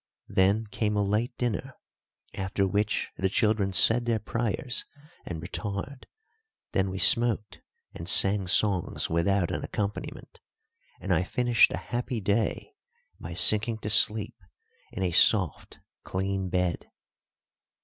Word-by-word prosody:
Then 100 +4 +2
came 105 -2 -1
a 100 - +1
late 105 +5 -2
dinner, 125 +2 -3 0.6
after 95 +1 -2
which 105 +2 -1
the 95 - 0
children 105 -1 0
said 115 +6 +4
their 115 -1 +1
prayers 115 +3 -3 0.4
and 85 -3 -5
retired, 100 - -6 0.6
then 95 0 0
we 95 - -5
smoked 110 +2 +2 0.3
and 85 +2 -4
sang 100 -1 +4
songs 95 -3 0
without 85 +2 0
an - - -4
accompaniment, 105 0 -6 0.6
and - - -1
I - - +2
finished 120 +5 +2
a - - -3
happy 120 0 -4
day 105 - -2 0.5
by - - -8
sinking 110 +1 +3
to 105 - -3
sleep 110 -1 +4 0.5
in 95 - -5
a 90 - 0
soft, 90 -2 +2 0.3
clean 95 0 -3
bed. 90 -2 -2
105 Hz, 130 wpm, -27 LUFS, 95-115 Hz, 0.6 s, said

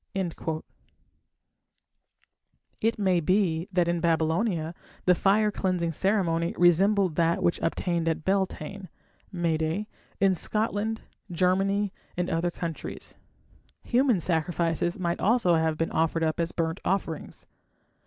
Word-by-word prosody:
It 225 +2 +1
may 190 -4 +2
be 175 -1 +1
that 175 -2 +2
in 170 0 0
Babylonia 165 +1 0 0.3
the 180 - +6
fire 205 +4 +3
cleansing 180 -4 -1
ceremony 170 -2 +1
resembled 185 0 +3
that 170 0 +2
which 170 - +1
obtained 170 0 -1
at 160 -1 -1
Beltane 190 -1 -2 0.4
(May 170 -4 0
Day) 160 +7 -2 0.3
in 195 -1 +4
Scotland, 215 +3 -1 0.3
Germany, 190 +3 +1 0.2
and 180 0 -1
other 165 +1 +1
countries. 170 -1 -6 0.7
Human 245 -4 +2
sacrifices 170 0 0
might 170 -2 -1
also 220 -4 +3
have 160 -1 +1
been 165 - -1
offered 165 +1 +1
up 160 +1 0
as 170 0 0
burnt 165 0 -2
offerings. 180 -5 -3
175 Hz, 115 wpm, -27 LUFS, 165-195 Hz, 0.7 s, the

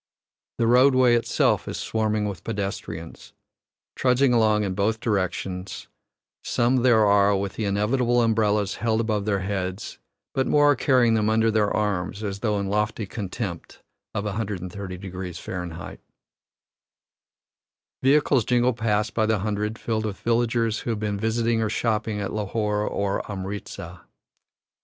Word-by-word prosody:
The 115 - +1
roadway 125 +1 +5
itself 120 0 +1
is - - -4
swarming 110 -1 -1
with 100 -3 -6
pedestrians, 100 -6 -5 0.6
trudging 125 0 +3
along 110 -2 +3
in 95 -2 -2
both 105 +3 0
directions; 95 -3 -3 0.5
some 120 +2 +1
there 120 -3 +4
are 100 0 +4
with 100 -1 -3
the 110 - -3
inevitable 120 +5 +1
umbrellas 105 -3 +1
held 110 0 0
above 110 -3 -1
their 100 -2 0
heads, 95 0 -4 0.3
but 130 - 0
more 145 0 +5
are - - +3
carrying 125 -2 +3
them 110 -1 +2
under 110 +1 +3
their 105 -1 +2
arms, 100 -1 -2
as 100 -1 -3
though 105 -1 0
in 100 - -2
lofty 105 +2 -1
contempt 95 -3 -6 0.3
of 100 - -1
130 100 -2 -4
deg. 95 0 -8 0.2
Fahr. 85 -1 -6 2.0
Vehicles 135 -2 +3
jingle 125 +2 +2
past 110 -1 0
by 110 -1 +1
the 110 -1 +2
hundred, 105 +2 -2
filled 110 -2 -2
with 100 - -5
villagers 115 -1 +1
who - - -5
have 110 -2 -1
been 105 -2 -2
visiting 115 +1 +1
or 110 - 0
shopping 110 -1 -1
at 100 - -3
Lahore 105 0 -1
or 100 -1 -1
Amritza. 95 -3 -6
105 Hz, 145 wpm, -24 LUFS, 100-115 Hz, 2.0 s, roadway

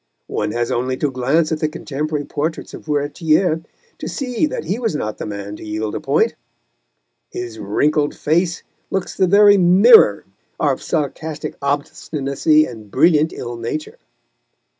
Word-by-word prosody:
One - - -2
has 120 0 -1
only 130 +2 -1
to 145 0 -1
glance 140 +6 +1
at 160 - -1
the 155 - 0
contemporary 150 -1 -4
portraits 155 +3 -4
of - - -10
Furetière 155 +3 +1 0.4
to - - -5
see 260 +1 -1
that 295 - -4
he 190 +8 -2
was 225 -8 -1
not 110 -7 -4
the - - -4
man 100 0 -6
to - - -11
yield 105 0 -3
a - - -3
point; - - +1 1.0
his 120 -2 -6
wrinkled 145 +9 0
face 170 +3 0 0.3
looks 190 -1 -3
the 190 - +2
very 205 +1 +6
mirror 185 - +6 0.3
of 140 -4 +1
sarcastic 155 0 -3
obstinacy 145 +1 +1
and 110 -4 -10
brilliant 155 - +3
ill 120 0 -6
nature. 120 +7 -5
150 Hz, 150 wpm, -19 LUFS, 130-165 Hz, 1.0 s, very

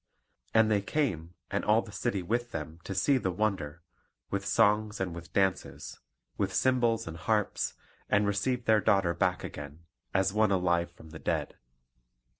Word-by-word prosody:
And 110 -1 +4
they 105 -1 +3
came, 95 - -1 0.2
and - - 0
all - - +3
the - - -11
city 95 -2 -2
with 120 +6 -1
them, 80 -3 -6
to 95 - -4
see 135 +8 +3
the 95 - -1
wonder, 85 -5 -2 0.5
with 100 0 -2
songs 105 0 +3
and 95 -3 -2
with 85 +1 -9
dances, 95 -2 -1 0.4
with - - 0
cymbals 120 -3 +2
and 80 0 -6
harps, 105 +5 0 0.3
and 105 +1 +3
received 115 +5 0
their 110 -1 +4
daughter 95 -3 +3
back - - 0
again, 75 +2 -8 0.3
as 95 0 +2
one 110 0 +3
alive 85 -2 +1
from 80 -2 -15
the 80 - -9
dead. - - -2
100 Hz, 165 wpm, -30 LUFS, 85-110 Hz, 0.5 s, And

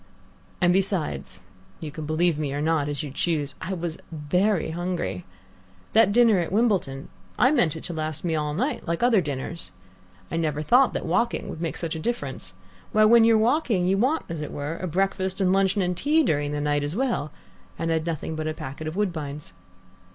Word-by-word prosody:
And 175 -1 +4
besides 185 - -1 0.4
you 155 -2 -6
can 150 0 -6
believe 160 0 +1
me 145 -3 -2
or - - -2
not 155 -1 +1
as 145 +1 -2
you 145 - -6
choose 145 -1 -1
I 190 - -3
was 170 -2 -4
very 170 +4 +1
hungry. 170 - -3 0.7
That 220 -3 +5
dinner 225 -3 +5
at 170 - -2
Wimbledon 190 - 0 0.3
I 255 - +5
meant 180 - +2
it 160 - -7
to 175 - -5
last 155 0 -3
me 165 - 0
all 150 -1 -1
night 255 - -2
like 170 +6 -1
other 235 -5 +5
dinners. 145 - -4 0.6
I - - -1
never 155 -2 -1
thought 250 - +4
that - - -3
walking 180 +8 0
would 160 - -7
make 165 - -2
such 165 -1 -3
a - - -4
difference. 240 +9 -3 0.4
Why, 215 -1 +5
when 230 +1 +7
you're 225 -1 +5
walking 225 - +2
you 195 +2 +2
want, 270 +8 +1
as 165 -2 -5
it 150 - -5
were, 145 +3 -4
a 185 - -4
breakfast 190 +2 0
and 185 -1 +3
luncheon 195 0 +2
and 180 0 -1
tea 300 - +3
during 145 - 0
the 145 0 -2
night 145 0 +1
as 145 +4 -2
well, 230 - -1 0.5
and 165 0 -1
I'd 160 0 0
nothing 160 -1 -3
but 155 0 -3
a 155 - -2
packet 140 +3 -6
of 155 - -4
Woodbines. 150 - -3
170 Hz, 200 wpm, -25 LUFS, 150-195 Hz, 0.7 s, when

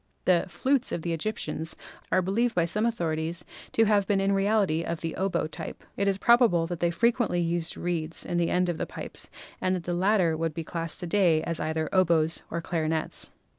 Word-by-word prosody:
The 180 -1 +3
"flutes" 265 +5 +1
of 165 - -3
the 170 - -1
Egyptians 165 -2 -2 0.4
are 185 - +3
believed 225 +6 +1
by 170 -2 +3
some 210 +7 +1
authorities 170 -5 -2 0.3
to 225 - +4
have 205 -2 +3
been 200 -1 +2
in 195 0 +2
reality 195 -4 +2
of 170 -1 -4
the 165 -1 -3
oboe 190 -4 0
type. 155 - -7
It 200 - 0
is 195 -1 +2
probable 235 -7 +4
that 170 0 -5
they 170 - +2
fre 225 +8 +3
quently 180 -8 0
used 170 -1 -2
reeds 165 -2 -2
in 175 - -2
the 170 -1 +2
end 180 0 +2
of 175 -2 -1
the - - -3
pipes - - -7 0.3
and 185 0 +1
that 180 - -4
the 175 - -2
latter 180 -2 +2
would 165 -1 -2
be 165 - -3
classed 165 +2 -4
to - - -3
day 170 -3 +3
as 165 - -2
either 160 0 -1
oboes 170 -3 +3
or 170 - -3
clarinets. 160 -2 -2
175 Hz, 210 wpm, -27 LUFS, 165-195 Hz, 0.4 s, to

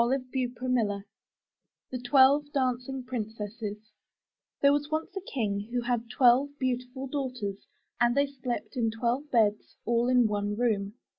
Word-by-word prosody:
^75 - - +6
MY 255 +3 +2 0.2
BOOK 250 -3 0
HOUSE 200 -1 -4 0.9
THE 255 - -3
TWELVE 270 +3 +5
DANCING 255 0 -1
PRINCESSES 220 -3 -5 0.9
There 280 0 +7
was 290 0 -1
once 315 +4 -3
a 390 - -3
King 205 -4 -2
who 245 0 0
had 240 -1 -1
twelve 260 +5 +4
beautiful 255 0 -2
daughters 250 -8 -4 0.3
and 240 +2 +3
they 280 - +5
slept 265 -2 -5
in 235 -3 +1
twelve 240 +6 -1
beds, 215 -4 +1
all 235 +1 +2
in 250 -1 +5
one 205 -1 -1
room. 210 -3 0
245 Hz, 150 wpm, -29 LUFS, 225-265 Hz, 0.9 s, There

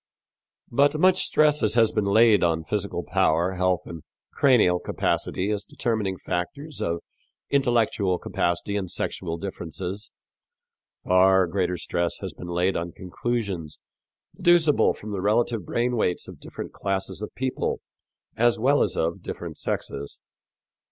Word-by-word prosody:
" - - -68 0.3
But 145 +4 +3
much 185 +2 +4
stress 150 -1 +3
as 110 - +1
has 115 -2 +4
been 105 -2 0
laid 110 +1 +5
on 80 -1 +1
physical - - -2
power, 85 +4 +2
health 90 -1 +1
and 85 -2 -8 0.3
cranial 110 -10 +4
capacity, 95 +3 -1
as 105 -1 -2
determining 105 -5 -2
factors 140 - -4
of 85 0 -1 0.5
intellectual 115 -8 +2
capacity 85 +4 -1
and 95 -3 -3
sexual 85 -1 -3
differences, 95 +2 -6 0.9
far 95 +1 +5
greater 90 0 -1
stress 85 0 -1
has - - -6
been 90 - -9
laid 90 +2 +1
on 85 0 -3
conclusions 95 -5 -4 0.6
deducible 170 -4 +4
from 105 - -8
the 100 -2 -3
relative 110 -1 +1
brain 120 +1 0
weights 90 -6 0
of - - -11
different - - -8
classes 95 0 -2
of 105 - -4
people 130 0 -2 0.6
as 120 +1 +3
well 135 +6 +3
as - - 0
of 85 +1 -1
different - - -6
sexes. 70 +1 -3
100 Hz, 140 wpm, -25 LUFS, 90-120 Hz, 0.9 s, laid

